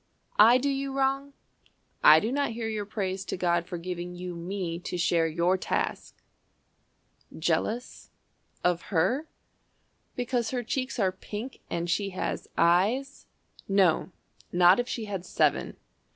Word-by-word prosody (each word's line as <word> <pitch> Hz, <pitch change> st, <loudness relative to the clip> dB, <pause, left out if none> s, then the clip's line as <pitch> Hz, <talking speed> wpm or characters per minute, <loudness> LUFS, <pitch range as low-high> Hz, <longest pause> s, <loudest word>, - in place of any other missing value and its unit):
I 230 Hz, +4 st, +8 dB
do 265 Hz, +2 st, -1 dB
you 275 Hz, 0 st, -1 dB
wrong? 275 Hz, +1 st, 0 dB, 0.7 s
I 155 Hz, +1 st, +9 dB
do 220 Hz, +8 st, -2 dB
not 280 Hz, -3 st, 0 dB
hear 225 Hz, 0 st, -4 dB
your 215 Hz, -2 st, -3 dB
praise 195 Hz, -3 st, -3 dB
To -, -, -4 dB
God 175 Hz, -1 st, +1 dB
for 180 Hz, -, -5 dB
giving 180 Hz, 0 st, -5 dB
you 180 Hz, 0 st, -6 dB
me 170 Hz, -1 st, -4 dB
to 180 Hz, -, -5 dB
share 170 Hz, -1 st, +2 dB
your 170 Hz, +3 st, +1 dB
task? -, -, -3 dB, 1.1 s
"Jealous 240 Hz, +3 st, -2 dB, 0.5 s
of 180 Hz, -1 st, 0 dB
Her? 245 Hz, -, +1 dB, 0.9 s
Because 245 Hz, -2 st, -1 dB
her 245 Hz, 0 st, -2 dB
cheeks 255 Hz, +3 st, -3 dB
are 195 Hz, -5 st, +2 dB
pink, 210 Hz, +6 st, -7 dB
And 170 Hz, 0 st, -2 dB
she 195 Hz, +3 st, 0 dB
has -, -, -3 dB
eyes? 205 Hz, -, +2 dB, 0.4 s
No, 195 Hz, -3 st, +3 dB, 0.4 s
not 180 Hz, +3 st, +6 dB
if 245 Hz, -, -1 dB
she 225 Hz, -, -3 dB
had 195 Hz, -4 st, -4 dB
seven. -, -, 0 dB
195 Hz, 140 wpm, -28 LUFS, 175-245 Hz, 1.1 s, I